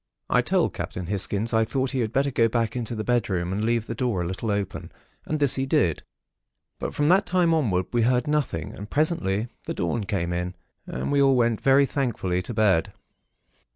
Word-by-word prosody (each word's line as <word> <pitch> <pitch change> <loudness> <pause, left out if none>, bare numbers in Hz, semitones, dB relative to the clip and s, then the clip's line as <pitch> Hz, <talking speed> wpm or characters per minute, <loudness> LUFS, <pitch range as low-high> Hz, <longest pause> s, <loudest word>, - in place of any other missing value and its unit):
"I - - +5
told - - +1
Captain 90 - -5
Hisgins 100 +4 -1
I 110 0 +4
thought 130 +3 -1
he 135 - -2
had 110 -3 -1
better 140 +2 +1
go 115 -2 +3
back 115 0 -1
into 120 -1 -3
the 110 - -3
bedroom, 95 -7 0
and 105 +2 -1
leave 115 0 +1
the 115 - -4
door 115 -6 -1
a - - -3
little 95 +6 -4
open, 100 -2 -3 0.4
and 155 - -1
this 140 -3 +4
he 135 0 -1
did. 85 - +2 0.8
But - - -4
from 145 - +1
that 195 +3 +4
time 175 -2 +3
onward, 105 - +1
we 120 - +2
heard 125 +1 +2
nothing; 150 - -1
and 105 +2 -8
presently 120 - 0 0.2
the - - -4
dawn 100 +5 -1
came 90 -3 -2
in, 90 +1 -3 0.3
and 65 - -3
we 140 0 +3
all 135 -1 +5
went 115 -3 +1
very 135 +1 +5
thankfully 110 -10 -1
to 120 - -6
bed. 100 -6 +2
115 Hz, 205 wpm, -25 LUFS, 95-135 Hz, 0.8 s, I